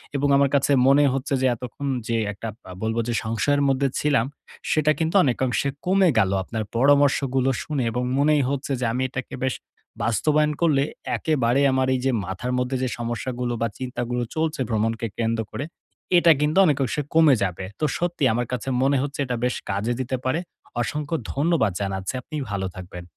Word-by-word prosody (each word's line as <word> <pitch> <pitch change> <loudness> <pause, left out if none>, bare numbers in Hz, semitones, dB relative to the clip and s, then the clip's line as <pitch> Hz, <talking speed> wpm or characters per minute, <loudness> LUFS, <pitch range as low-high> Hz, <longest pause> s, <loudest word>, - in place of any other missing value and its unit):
এবং 140 +1 +1
আমার 140 -1 +3
কাছে 140 +1 +2
মনেই 140 +1 +5
হচ্ছে 135 +2 -2
যে, - - +2
এতক্ষণ 125 +4 -6 0.2
যে 115 -1 0
একটা 105 +3 -7 0.2
বা 95 - -11
বলবো 110 +1 0
যে 120 - -1
সংশয়ের 115 +6 +1
মধ্যে 135 +1 +2
ছিলাম। 140 -6 +2 0.5
সেটা 155 0 +3
কিন্তু 160 +3 -1
অনেকাংশে 130 +1 0 0.2
কমে 190 -1 +4
গেল। 95 -2 +2
আপনার 110 +1 -4
পরামর্শগুলো 135 -1 +3
শুনে 145 -5 -2
এবং 125 +2 -2
মনেই 150 0 +3
হচ্ছে 140 0 -3
যে 125 - -1
আমি 125 - -1
এটাকে 130 0 -5
বেশ 130 - 0 0.5
বাস্তবায়ন 150 +7 +2
করলে, 145 -5 +3 0.3
একেবারে 135 -4 +1
আমার 130 0 +1
এই 130 - 0
যে 135 - +3
মাথার 95 +7 -4
মধ্যে 125 +1 -1
যে 130 - 0
সমস্যাগুলো, 120 +1 -3
বা 115 - +2
চিন্তাগুলো 125 -1 -3
চলছে 160 -3 -1
ভ্রমণকে 115 +1 0
কেন্দ্র 115 -1 0
করে। 125 +6 -4 0.5
এটা 170 -1 +6
কিন্তু 150 +4 +1
অনেকংশে 145 -3 +1
কমে 160 -4 +6
যাবে। 95 0 -3
তো 155 - +1
সত্যি 175 -4 -2
আমার 120 0 -1
কাছে 125 +1 -4
মনে 135 +1 +3
হচ্ছে 145 +2 -4
এটা 125 -1 -2
বেশ 125 - 0
কাজে 105 +5 0
দিতে 130 +1 -2
পারে। 130 +6 +1 0.4
অসংখ্য 150 +6 -2 0.2
ধন্যবাদ 145 - +2
জানাচ্ছি। 95 +1 -3
আপনি 155 - -9 0.2
ভালো 95 -2 -2
থাকবেন। 90 -1 -8
130 Hz, 175 wpm, -24 LUFS, 115-145 Hz, 0.5 s, এটা